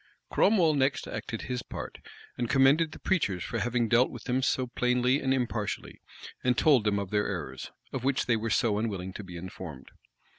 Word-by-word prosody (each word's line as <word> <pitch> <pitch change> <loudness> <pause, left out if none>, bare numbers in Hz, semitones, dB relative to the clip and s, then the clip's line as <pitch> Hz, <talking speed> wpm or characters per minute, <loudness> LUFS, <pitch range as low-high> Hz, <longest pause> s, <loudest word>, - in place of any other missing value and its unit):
Cromwell 180 -7 +4
next 135 -1 +1
acted - - -5
his 125 -1 -3
part, - - -7 0.4
and 120 -2 -2
commended 140 +4 +4
the - - -9
preachers 100 - 0
for 115 - -3
having 120 0 +1
dealt 120 +2 +4
with 120 - -9
them 125 +1 0 0.3
plainly 125 +2 +2
and 130 - 0
impartially, 120 -5 -2 0.4
and 125 -1 +2
told 135 -8 +4
them 105 -1 +2
of 100 -2 -3
their 105 0 +1
errors, 75 -9 -5 0.2
of 130 - -3
which 135 0 +1
they 120 - +3
were 115 +1 -2
so 105 -2 +2
unwilling 95 -4 -3
to 105 - -7
be 90 -2 -9
informed. 85 -6 -8
120 Hz, 185 wpm, -29 LUFS, 100-130 Hz, 0.4 s, Cromwell